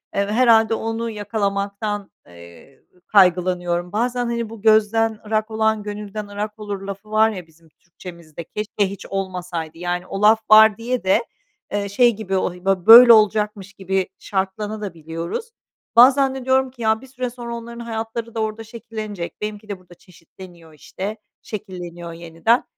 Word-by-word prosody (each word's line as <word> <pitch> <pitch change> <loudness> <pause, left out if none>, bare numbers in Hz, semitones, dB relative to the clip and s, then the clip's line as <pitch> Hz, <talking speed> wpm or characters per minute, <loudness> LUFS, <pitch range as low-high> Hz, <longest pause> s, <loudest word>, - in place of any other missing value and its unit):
Eee, 200 0 +1
ve 205 - -4
herhâlde 225 -2 +4
onu 225 +1 -3
yakalamaktan, 205 -1 -3 0.2
eee, 85 +9 -16 0.3
kaygılanıyorum. 180 -2 +2
Bazen 245 +3 -1
hani 235 -2 -3
bu, 225 -3 -11
"Gözden 220 0 +3
ırak 215 +1 -1
olan 220 -1 +1
gönülden 210 0 -6
ırak 210 +1 -5
olur." 205 -2 -5
lafı 200 +2 -8
var 220 +1 +4
ya 185 -5 -7
bizim 160 0 -24
Türkçemizde, 170 -1 -12
keşke 210 +2 -2
hiç 200 - -9
olmasaydı. 180 -4 -4
Yani 175 +1 -3
o 195 - -5
laf 215 +1 +6
var 215 -1 +8
diye 240 +1 -3
de, 195 +5 +2 0.5
eee, 200 -1 -2
şey 235 +3 +3
gibi, 200 -2 -6
he 190 - +3
o 185 - -1
bö 190 -2 +1
böyle 235 +1 +11
olacakmış 210 -2 +1
gibi 190 -1 -2
şartlanabiliyoruz 190 - -4
da. - - -65 0.4
Bazen 265 +2 +6
de 260 - -7
diyorum 260 0 +2
ki, 250 -2 -14
"Ya, 220 0 +1
bir 265 - -13
süre 255 -1 -4
sonra 235 -1 -7
onların 235 0 -9
hayatları 230 0 -5
da - - -2
orada 220 +1 -3
şekillenecek, 215 -5 -7
benimki 210 0 -6
de 200 -2 -5
burada 180 -1 -18
çeşitleniyor 170 -1 -16
işte, 195 +8 -6 0.2
şekilleniyor 175 -5 -8
yeniden. 170 +8 0
210 Hz, 160 wpm, -21 LUFS, 185-225 Hz, 0.5 s, böyle